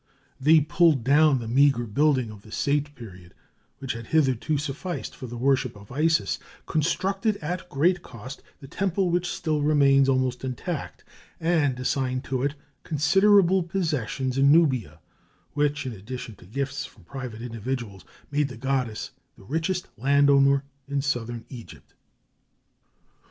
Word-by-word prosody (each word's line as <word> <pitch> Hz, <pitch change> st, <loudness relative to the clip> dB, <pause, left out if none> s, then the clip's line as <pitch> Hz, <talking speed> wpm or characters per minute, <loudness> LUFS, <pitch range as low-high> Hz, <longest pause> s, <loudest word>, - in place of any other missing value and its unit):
They 155 Hz, +3 st, +5 dB
pulled 150 Hz, -2 st, +3 dB
down 145 Hz, +2 st, +5 dB
the 115 Hz, -2 st, -5 dB
meagre 130 Hz, 0 st, +3 dB
building 130 Hz, +1 st, +1 dB
of 105 Hz, -2 st, -12 dB
the 110 Hz, -, -16 dB
Saite 145 Hz, +3 st, -1 dB
period, 95 Hz, -8 st, -12 dB, 0.4 s
which 135 Hz, -1 st, -4 dB
had 115 Hz, -1 st, -8 dB
hitherto 150 Hz, -1 st, +1 dB
sufficed 150 Hz, +5 st, -5 dB
for 130 Hz, -, -8 dB
the 120 Hz, +1 st, -7 dB
worship 130 Hz, -1 st, +1 dB
of 105 Hz, +1 st, -14 dB
Isis, 155 Hz, +4 st, +1 dB, 0.3 s
constructed 195 Hz, +6 st, 0 dB
at 175 Hz, +3 st, -5 dB
great 175 Hz, +6 st, +2 dB
cost 125 Hz, -1 st, -10 dB, 0.2 s
the 135 Hz, -, -10 dB
temple 190 Hz, +3 st, 0 dB
which 175 Hz, 0 st, 0 dB
still 155 Hz, -4 st, -1 dB
remains 140 Hz, -2 st, +4 dB
almost 130 Hz, -1 st, 0 dB
intact, 130 Hz, -2 st, -5 dB, 0.4 s
and 155 Hz, -6 st, +1 dB
assigned 130 Hz, 0 st, -1 dB
to 130 Hz, -1 st, -2 dB
it 140 Hz, +2 st, -1 dB, 0.3 s
considerable 190 Hz, +5 st, +4 dB
possessions 145 Hz, -, -2 dB
in 140 Hz, +1 st, +6 dB
Nubia, 130 Hz, -, +3 dB, 0.6 s
which, 145 Hz, 0 st, 0 dB
in 130 Hz, -, -3 dB
addition 115 Hz, +3 st, -7 dB
to 90 Hz, -, -16 dB
gifts 135 Hz, +5 st, -3 dB
from 105 Hz, -, -13 dB
private 120 Hz, +2 st, -7 dB
individuals, 115 Hz, -4 st, -5 dB, 0.3 s
made 145 Hz, 0 st, +1 dB
the 125 Hz, -3 st, -9 dB
goddess 130 Hz, -3 st, -2 dB, 0.3 s
the -, -, -16 dB
richest 165 Hz, -, -2 dB
land 140 Hz, +3 st, +4 dB
owner 140 Hz, 0 st, +4 dB, 0.2 s
in 140 Hz, -1 st, -1 dB
Southern 120 Hz, -4 st, -3 dB
Egypt. 120 Hz, -4 st, -12 dB
140 Hz, 145 wpm, -25 LUFS, 125-155 Hz, 0.6 s, in